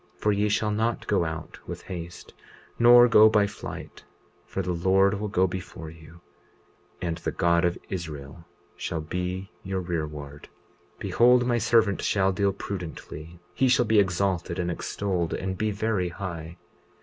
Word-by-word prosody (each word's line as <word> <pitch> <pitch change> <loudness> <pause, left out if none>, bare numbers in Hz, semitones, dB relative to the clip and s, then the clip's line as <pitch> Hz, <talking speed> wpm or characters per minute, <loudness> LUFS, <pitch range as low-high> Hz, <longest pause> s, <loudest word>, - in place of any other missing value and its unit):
20:42 - - -31
For 105 - +3
ye 105 +1 +1
shall 105 +1 +1
not 110 +2 -1
go 100 -4 +1
out 80 0 -6
with - - -7
haste 85 -1 -8 0.5
nor 120 +1 +8
go 110 -2 +7
by 105 -2 +4
flight; 100 - -8 0.4
for 95 - -3
the 90 0 -1
Lord 95 +3 +3
will 105 - -2
go 95 -2 +2
before 90 -3 -6
you, 80 +1 -15 0.8
and 85 -2 -2
the - - -2
God 85 0 +2
of 85 0 0
Israel 80 -3 -6 0.3
shall 85 - -3
be 90 +4 -4
your 95 0 -3
rearward. 75 -5 -5 0.5
20:43 - - -32
Behold, 125 +1 +4
my 120 -1 +1
servant 110 -2 +3
shall 95 -1 +2
deal 100 +1 +1
prudently; 85 -4 -7
he 135 - +2
shall 125 -1 +4
be 110 -1 +4
exalted 90 -2 0
and 90 -1 -1
extolled 90 -1 -2
and 95 0 -3
be 110 +1 +1
very 105 -3 -1
high. 85 -2 -6
95 Hz, 160 wpm, -26 LUFS, 85-105 Hz, 0.8 s, nor